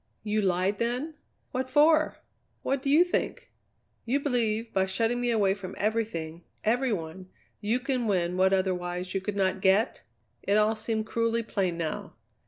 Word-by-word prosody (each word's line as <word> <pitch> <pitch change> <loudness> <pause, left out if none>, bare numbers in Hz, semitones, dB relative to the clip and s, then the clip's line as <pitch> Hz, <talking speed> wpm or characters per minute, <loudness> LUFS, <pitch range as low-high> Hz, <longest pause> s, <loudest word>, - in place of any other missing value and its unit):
"You 215 0 0
lied, 190 +1 +1
then? 250 +7 -1 0.4
What 260 -1 -2
for?" 310 +3 +4 0.5
"What 275 -1 0
do 275 - -2
you 310 +5 +7
think?" 355 - -2 0.5
"You 260 +4 +1
believe, 230 -5 0
by 190 -1 +2
shutting 230 +5 0
me 245 - 0
away 205 -4 +3
from 195 -2 -8
everything, 200 -7 -2 0.2
every 245 +3 +2
one, 180 0 -5 0.3
you 220 +4 0
can 255 -2 -1
win 180 -3 +1
what 190 +1 +3
otherwise 180 -1 -1
you 195 - -1
could 205 +1 -3
not 190 -1 0
get?" 195 +5 +3 0.4
It 200 +1 +2
all 215 +1 +3
seemed 220 0 -2
cruelly 230 +1 0
plain, 190 -6 -1
now. 160 -2 -4
215 Hz, 165 wpm, -28 LUFS, 190-240 Hz, 0.5 s, you